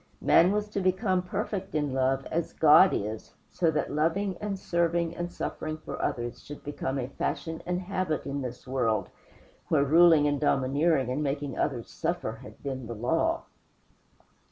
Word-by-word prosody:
Man 180 +3 +5
was 210 +1 0
to 205 - -2
become 185 0 +1
perfect 185 0 -4
in 145 -3 0
love 135 +1 +1
as 165 0 -2
God 160 +4 +7
is, 105 +2 -4 0.2
so 170 - +1
that 150 -3 -1
loving 170 +6 0
and 205 -2 -3
serving 170 -2 0
and 175 0 -4
suffering 155 0 -4
for 155 - -7
others 120 0 -3
should 145 - -10
become 140 -2 -3
a 125 -2 -2
fashion 160 +4 -3
and 180 0 0
habit 185 -4 -2
in 140 0 -3
this 125 -1 -6
world, 115 -7 0 0.6
where 150 -3 +3
ruling 160 0 +6
and 145 -1 0
domineering 140 0 +2
and 140 +4 -1
making 140 -2 -2
others 125 -6 -2
suffer 170 -7 -2
had 105 - -13
been 130 -4 -4
the 115 - -5
law. 120 +4 0
150 Hz, 165 wpm, -28 LUFS, 135-175 Hz, 0.6 s, God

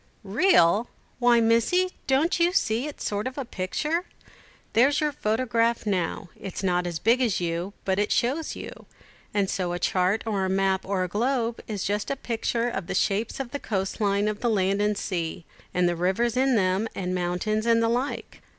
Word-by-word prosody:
"Real! 205 - +3 0.3
Why, 240 -1 +5
Missie, 230 +12 +3 0.2
don't 285 +7 +2
you 345 +1 +3
see 235 - +1
it's 295 - -7
a - - -1
sort 205 +3 -2
of 260 - -7
a 275 - -3
picture? 300 - -2 0.7
There's 270 +6 +4
your 300 -1 +1
photograph 230 -2 0
now, 190 -2 -1
it's 195 0 -7
not 180 -1 +1
as 170 -2 -3
big 230 +9 +3
as 230 -7 +1
you, 175 +3 -2
but 190 0 +1
it 205 - 0
shows 275 +7 0
you; - - -9 0.4
and 200 -2 +1
so 180 -2 -2
a - - -1
chart, 185 +4 +1
or 205 -4 0
a 190 - 0
map, 190 0 +1
or 190 -2 0
a - - -1
globe, 235 +4 -1
is 210 -3 -3
just 205 +1 -1
a 275 - 0
picture 235 -2 -1
of 195 -7 -4
the - - -3
shapes 205 +5 0
of 260 -3 -4
the 285 - -4
coast 195 -2 -3
line 200 0 +2
of 210 -1 -2
the 240 - 0
land 200 -1 +1
and 210 0 +1
the - - -4
sea, 170 -3 -3 0.3
and 180 0 +2
the 175 - 0
rivers 190 +7 0
in 260 0 +3
them, 190 +1 +1
and 185 -1 -2
mountains, 180 +5 -1
and 230 0 +4
the - - +3
like. 245 +5 -2
215 Hz, 205 wpm, -26 LUFS, 190-240 Hz, 0.7 s, Why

